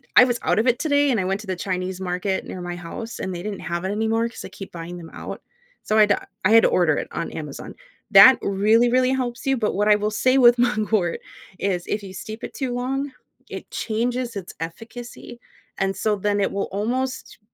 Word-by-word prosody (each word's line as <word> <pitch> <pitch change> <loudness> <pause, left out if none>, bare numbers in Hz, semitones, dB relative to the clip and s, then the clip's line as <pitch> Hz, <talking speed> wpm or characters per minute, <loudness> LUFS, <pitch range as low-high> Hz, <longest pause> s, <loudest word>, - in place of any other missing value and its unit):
I - - +10
was 245 -1 -1
out - - +2
of 225 - +1
it 245 -1 +3
today 285 -2 +2
and 230 - +1
I 185 - -1
went 195 +2 -1
to 215 - -12
the 185 - -2
Chinese 185 0 -3
market 185 +1 -2
near 185 - -7
my 175 0 -5
house, 175 +7 -7
and 185 -1 -4
they 175 - -6
didn't 205 -1 -4
have 170 +1 -3
it - - -1
anymore 225 +2 0
'cause 230 - -9
I - - -8
keep 195 - -10
buying 170 +1 -7
them 165 -2 -10
out, - - -7 0.4
so 215 - +1
I - - +7
had 210 -1 +5
uh - - -2 0.3
I 200 - +4
had 225 0 +7
to - - +5
order 165 -4 +3
it - - -3
on 170 - -3
Amazon. 150 -3 -7 0.4
That 205 +6 +9
really, 215 +5 +3
really 255 +1 +3
helps 245 -2 -2
you, 270 - +3
but 215 -3 -1
what 205 +2 +1
I 210 - +7
will 210 0 -1
say 255 +5 +2
with 240 -1 +7
mugwort 215 -7 +1 0.4
is, 185 -3 -1
if 210 - -2
you 195 - -8
steep 215 +4 -8
it - - -6
too 260 -3 -2
long, 270 +3 -2 0.4
it - - -8
changes 240 +1 -2
its 190 -3 -6
efficacy 235 +7 -8 0.4
and 195 0 0
so 210 +2 0
then 205 +1 0
it 195 - +1
will 200 - -2
almost 250 +6 -3
210 Hz, 235 wpm, -23 LUFS, 190-240 Hz, 0.4 s, I